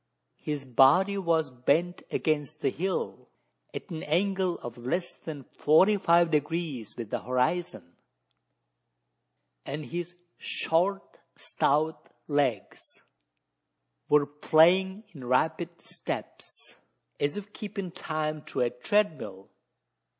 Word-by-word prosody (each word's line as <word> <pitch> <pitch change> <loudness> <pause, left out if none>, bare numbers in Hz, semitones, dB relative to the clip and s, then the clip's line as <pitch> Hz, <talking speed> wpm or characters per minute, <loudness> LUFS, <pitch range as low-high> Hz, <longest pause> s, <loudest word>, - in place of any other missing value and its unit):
His 145 -2 -4
body 140 +11 +5
was 165 -6 +1
bent 160 +8 +1
against 155 0 -1
the - - +2
hill 190 +2 -3 0.4
at - - -8
an 160 -1 -4
angle 185 +2 +1
of 120 -1 -6
less 155 +9 -3
than 150 -4 -8
forty 175 +11 +4
five 170 -3 +4
degrees 150 -7 -1
with 115 -4 -6
the - - 0
horizon; 125 - -1 1.7
and 150 +1 -5
his 175 +1 -5 0.2
short 190 +5 -1 0.2
stout 155 +3 0 0.2
legs 140 -8 -1 1.1
were 150 -1 +5
playing 175 +7 +4
in 140 -6 -10
rapid 160 +7 0
steps, - - -7 0.4
as 145 +6 0
if 205 0 -8
keeping 200 -3 -5
time 155 -1 -3
to - - -3
a 120 -1 +2
treadmill! 125 - -1
160 Hz, 105 wpm, -28 LUFS, 140-175 Hz, 1.7 s, body